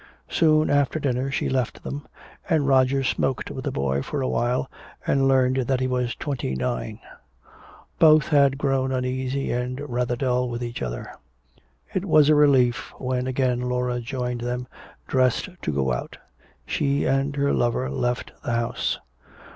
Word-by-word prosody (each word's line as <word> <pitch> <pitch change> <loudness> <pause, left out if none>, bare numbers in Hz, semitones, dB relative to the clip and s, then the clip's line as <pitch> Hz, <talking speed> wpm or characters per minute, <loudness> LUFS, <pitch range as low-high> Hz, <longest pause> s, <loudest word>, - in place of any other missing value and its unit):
Soon 155 -2 +3
after 145 +1 +2
dinner 135 -2 -1
she 135 - -1
left 130 -3 -1
them, 145 +1 -6 0.4
and 155 -5 +2
Roger 135 0 +3
smoked 130 0 -1
with - - -6
the - - -1
boy 70 0 0
for 145 - -4
a 130 - 0
while 125 +2 0 0.4
and 135 -1 +2
learned 130 -1 +3
that 130 0 +1
he 130 - 0
was 125 -1 -1
twenty 130 - -3
nine. 65 -1 -3 1.0
Both 155 -2 +6
had 140 -3 +4
grown 135 -2 0
uneasy 130 +1 -1
and 125 +2 -2
rather 125 -1 -1
dull 125 -1 0
with 120 0 -4
each 120 0 -5
other. - - -4 0.8
It - - -1
was 150 -1 +5
a - - +7
relief 135 -5 +3
when 130 -1 -2
again 125 -1 0
Laura 125 0 -1
joined 125 0 -3
them, 125 +1 -3 0.4
dressed 130 - +1
to - - -1
go 65 -3 0
out. - - -5 0.5
She 140 0 0
and 135 +2 +1
her 140 0 +1
lover 120 - +1
left 120 - -2
the 120 - -2
house. 115 0 -1
130 Hz, 160 wpm, -24 LUFS, 120-135 Hz, 1.0 s, a